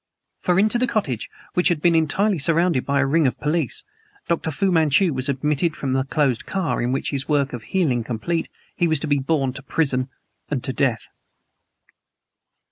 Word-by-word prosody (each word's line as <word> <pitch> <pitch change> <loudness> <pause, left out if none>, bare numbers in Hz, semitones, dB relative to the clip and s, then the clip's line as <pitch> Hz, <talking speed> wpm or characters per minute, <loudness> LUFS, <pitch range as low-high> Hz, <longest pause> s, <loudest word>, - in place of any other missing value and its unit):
For 180 -2 +1
into 215 +4 +3
the 255 - +2
cottage, 150 - -2 0.2
which 180 - +2
had 175 -4 +2
been 170 +2 +3
entirely 175 +4 +2
surrounded 165 -1 +2
by 140 0 +2
a - - +2
ring 150 +1 +3
of 125 - -3
police, 150 -3 -1 0.4
Dr. 170 -1 0
Fu 190 +5 0
Manchu 160 +1 +3
was 130 +1 -1
admitted 150 +4 0
from 135 -3 -2
the 130 0 +1
closed 135 -4 0
car 190 -5 -1
in 120 +1 0
which, 135 - -1
his 140 0 -3
work 140 -3 +1
of 120 - -5
healing 130 -5 0
complete, 125 +9 -2 0.3
he 175 - +2
was 160 -2 +1
to - - -2
be 145 -1 +2
borne 135 -2 0
to 140 - -7
prison 135 -2 0 0.4
to 145 - 0 0.2
death! 125 -2 0
150 Hz, 185 wpm, -22 LUFS, 135-170 Hz, 0.4 s, into